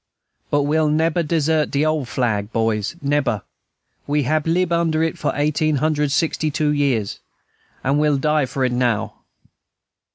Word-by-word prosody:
"But 145 0 +2
we'll 155 +1 +2
neber 160 +3 +1
desert 155 -1 +1
de 145 +2 +1
ole 155 -3 0
flag, 110 -4 -1
boys, 110 +3 -1
neber; 140 -8 0 0.6
we 145 0 +1
hab 155 +3 0
lib 175 +1 +1
under 165 -2 +1
it 165 - -1
for - - -1
eighteen 150 +1 +1
hundred 150 0 0
sixty 160 +1 0
two 150 0 0
years, 135 -8 0 0.6
and 140 +3 +1
we'll 150 -1 +2
die 150 0 +1
for 130 +1 -1
it 125 - 0
now." 120 -4 0
150 Hz, 155 wpm, -21 LUFS, 130-155 Hz, 0.6 s, But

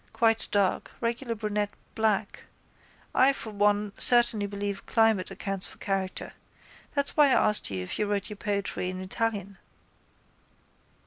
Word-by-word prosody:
Quite 225 -1 +1
dark, 200 -3 -1
regular 235 0 -4
brunette, 210 -1 -3 0.2
black. 220 -2 -2 0.7
I 270 +2 +3
for 225 -5 -7
one 205 0 0
certainly 235 -4 +7
believe 200 0 -6
climate 225 -4 +1
accounts 195 -2 -5
for - - -13
character. 195 -1 -4 0.6
That's 280 0 0
why 295 -2 +5
I 260 - +2
asked 210 - +7
you 95 -2 -5
if 90 - -6
you 210 - -1
wrote 200 -1 -2
your 210 - -9
poetry 200 -3 -4
in 185 0 -7
Italian. 200 0 -4
205 Hz, 140 wpm, -26 LUFS, 200-225 Hz, 0.7 s, certainly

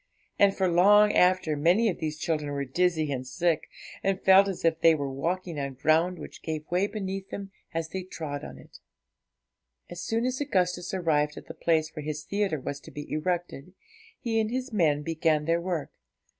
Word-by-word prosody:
And 200 -1 +4
for 190 - +2
long 205 +4 +5
after 180 -4 +3
many 175 +10 +3
of 190 - -1
these 155 -1 -3
children 150 -2 -2
were 140 -1 -2
dizzy 160 +1 +1
and 130 -1 -4
sick, 160 +4 0 0.3
and 195 -1 0
felt 190 +1 +6
as 190 -3 -4
if 165 -1 +2
they 165 -1 +6
were 140 -2 -3
walking 170 +3 -3
on 140 -1 -4
ground 160 +6 +2
which - - -10
gave 155 -1 -4
way 185 +3 +2
beneath 195 -2 -5
them 195 -1 -7 0.2
as 165 -1 -3
they 190 +3 -4
trod 155 -6 -6
on 70 - -8
it. 70 - -15 1.1
As 175 - -6
soon 230 +2 -1
as 255 +2 -1
Augustus 180 -9 0
arrived 150 -5 0
at - - -9
the - - -8
place 160 -1 0
where 155 - -5
his 150 0 -4
theatre 200 -3 -1
was 140 +2 -5
to - - -13
be 145 0 -8
erected, 175 +1 -3 0.4
he 225 -3 0
and 215 -1 0
his 255 +1 -3
men 150 -7 +2
began 160 -1 +1
their 165 +1 +1
work. 170 -4 -3
170 Hz, 195 wpm, -27 LUFS, 150-190 Hz, 1.1 s, felt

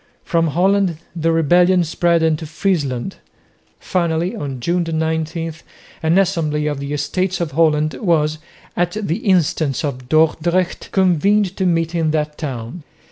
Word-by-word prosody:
From 165 -2 +1
Holland 185 +2 +2 0.2
the 165 0 +1
rebellion 175 +3 +4
spread 170 +1 +1
into 160 -1 0
Friesland. 155 -3 -2 0.6
Finally 170 0 -1
on 135 -3 -5
June 175 +8 0
19 160 +1 -2 0.5
an 160 +3 +2
assembly 165 -6 +1
of 145 -2 -2
the 140 +1 -5
Estates 175 +6 -1
of 170 -3 -2
Holland 155 0 +2
was, 155 0 0 0.4
at 175 0 0
the 190 -5 -1
instance 160 - +1
of 130 -4 -4
Dordrecht, 160 +3 +1
convened 190 +2 +2
to 190 - 0
meet 165 -1 0
in 165 -2 +1
that 150 -1 -2
town. 130 +1 -5
165 Hz, 135 wpm, -19 LUFS, 150-175 Hz, 0.6 s, rebellion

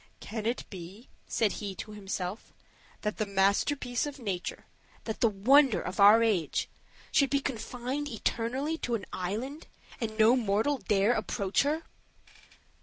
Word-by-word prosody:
"Can 220 -1 -4
it 240 - -2
be," 190 +5 -10 0.2
said 220 -3 +1
he 200 -3 -5
to 215 - -7
himself, 195 -1 -5 0.5
"that 210 -1 -2
the 215 - 0
masterpiece 235 +7 +1
of 290 -1 -7
nature, 195 -8 -4 0.4
that 220 - -4
the 230 - +5
wonder 255 +6 +5
of 180 +4 -5
our 210 +3 +8
age, 190 -9 +1 0.4
should 275 -2 +4
be 280 - +2
confined 260 +2 -4
eternally 260 +6 -2
in 240 - +1
an 200 - -4
island, 230 - -4 0.3
and 220 -2 -3
no 220 +2 +6
mortal 235 +4 +1
dare 205 +2 +2
to - - +1
approach 200 -1 0
her? 305 +3 0
225 Hz, 150 wpm, -29 LUFS, 200-260 Hz, 0.5 s, our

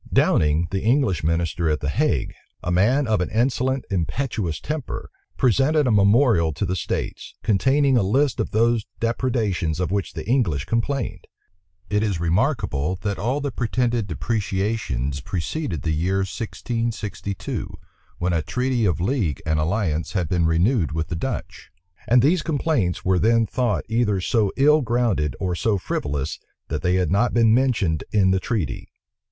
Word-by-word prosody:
Downing, 75 +2 +3
the 95 - -1
English 115 - +1
minister 85 0 0
at 75 - 0
the 70 - -2
Hague, 95 - 0 0.3
a 90 - -1
man 120 +11 +3
of 110 -5 +1
an 90 - -1
insolent, 130 +3 0
impetuous 95 - -2
temper, 150 -4 -5 0.3
presented 140 +4 +3
a 125 - +2
memorial 100 - +4
to 100 - -2
the 95 0 -1
states, - - -4
containing 135 +5 +3
a - - +3
list 130 +7 +1
of - - -1
those 115 0 +1
depredations 115 - -1
of 90 0 -1
which 100 -1 -2
the - - -7
English 105 - +1
complained. 120 +2 -2 0.6
It 105 0 +2
is 100 -6 -1
remarkable, 85 - 0
that 100 -1 -2
all 130 +8 -1
the 140 -1 -2
pretended 120 -2 0
depreciations 95 - -2
preceded 90 - -3
the 80 - 0
year 90 +5 0
1662, 110 -2 -4 0.5
when 90 0 -1
a 80 - +1
treaty 125 - 0
of 90 -4 +1
league 95 - 0
and 80 0 +1
alliance 85 -1 -1
had 90 -5 0
been 85 0 +1
renewed 85 - +2
with 80 0 -2
the 85 - -2
Dutch; 80 - -5 0.4
and 120 +1 +5
these 165 +5 +3
complaints 145 - -1
were 95 -1 +3
then 115 +2 +3
thought 120 -1 -1
either 110 -3 +1
so 105 +2 +1
ill 150 +3 +5
grounded 115 - 0
or 95 -2 -1
so 105 +3 +1
frivolous, 75 -4 -3 0.3
that - - -2
they 90 0 +1
had 90 -3 +1
not 115 +6 +2
been 115 -2 +5
mentioned 115 - +1
in 95 -3 +3
the 95 - +2
treaty. 100 -4 -3
105 Hz, 160 wpm, -23 LUFS, 85-120 Hz, 0.6 s, and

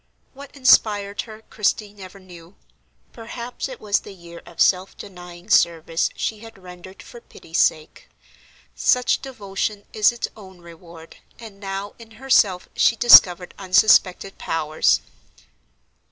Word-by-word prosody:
What 280 +1 -14
inspired 205 -7 +2
her, 220 0 -13
Christie 210 -1 -2
never 195 -1 -13
knew; 175 -1 -16 0.6
perhaps 235 +3 -8
it 260 - -10
was 205 -1 -1
the 200 - -13
year 170 -1 -13
of 170 - -16
self 185 0 +1
denying 180 -2 -12
service 165 -2 +1
she 220 - -4
had 225 0 -14
rendered 185 0 -14
for 240 - -14
pity's 165 -5 -7
sake; 155 -1 -1 0.6
such 250 0 +1
devotion 205 -4 -5
is 215 +1 +3
its 240 - -5
own 190 -4 -15
reward, 170 -1 -15 0.2
and 215 -4 -13
now, 195 0 -6
in 230 -1 -14
herself, 215 -8 +1
she 230 - +2
discovered 180 -7 +6
unsuspected 195 0 +2
powers. 155 -1 0
195 Hz, 130 wpm, -21 LUFS, 180-220 Hz, 0.6 s, discovered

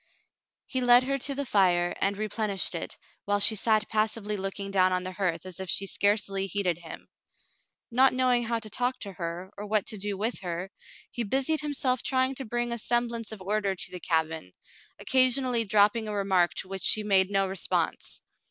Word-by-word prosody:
He 260 - -3
led 245 0 +6
her 275 +1 -2
to 275 +2 0
the 280 +1 -2
fire, 180 -6 +2
and 200 0 +1
replenished 210 -2 -1
it, - - -5 0.3
while 205 0 +1
she 220 +2 +5
sat 215 0 +1
passively 215 -1 -1
looking 195 0 -4
down 185 -1 +3
on 180 0 0
the 185 - -5
hearth 185 -3 -2
as 185 -1 -8
if 190 -1 -5
she 195 - +1
scarcely 200 -1 0
heeded 185 -3 -1
him. 165 -2 -10 0.8
Not 260 +3 +5
knowing 250 -2 +2
how 230 0 0
to 220 -1 -6
talk 250 +3 0
to 200 -2 -6
her, 175 +1 -6
or 210 - -6
what 210 -1 +1
to 215 - -3
do 200 0 -3
with 220 +5 -2
her, 180 +1 -5 0.4
he 240 - -4
busied 270 +8 +1
himself 265 -4 0
trying 260 0 +1
to 270 0 -5
bring 240 +1 -2
a 235 - -2
semblance 235 -1 -1
of 210 -3 -8
order 200 0 -1
to - - -1
the 180 - -7
cabin, 160 - -2 0.4
occasionally 255 -2 +2
dropping 210 +2 +3
a 210 - -4
remark 190 -3 +1
to - - -3
which 190 0 -6
she 215 - +3
made 195 -2 +3
no 195 -1 +1
response. 190 -1 -2
205 Hz, 195 wpm, -27 LUFS, 190-240 Hz, 0.8 s, led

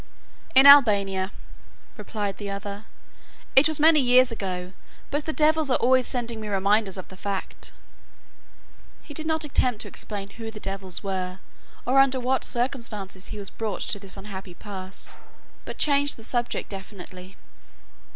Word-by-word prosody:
"In 265 +1 +8
Albania," 200 -9 +6 0.6
replied 205 -3 -4
the 205 -1 -5
other; 200 +1 -6 0.7
"it 270 +3 +7
was 315 -1 +1
many 310 0 +6
years 250 -1 +5
ago, 185 -4 -4 0.4
but 290 +1 -1
the 315 - -1
devils 310 -1 +2
are 255 - +4
always 255 +1 +3
sending 235 -3 -3
me 215 - -6
reminders 200 0 +1
of 185 - -7
the 190 - -11
fact." 195 0 -4 1.3
He 295 - -10
did 315 +2 -4
not 320 0 +1
attempt 250 -5 +1
to - - -9
explain 200 -2 -6
who 225 -1 -7
the 220 -1 -9
devils 195 -2 -5
were 185 -2 -3 0.5
or 260 +2 +4
under 270 -1 +4
what 255 +1 0
circumstances 230 -7 -2
he - - -7
was 200 -2 -6
brought 215 -5 -4
to 205 - -2
this 195 -1 -9
unhappy 195 -2 -8
pass, 190 -2 -7 0.5
but - - -7
changed 285 -1 +3
the 225 - -11
subject 240 +1 -2
definitely. 190 -1 -9
210 Hz, 155 wpm, -25 LUFS, 195-260 Hz, 1.3 s, In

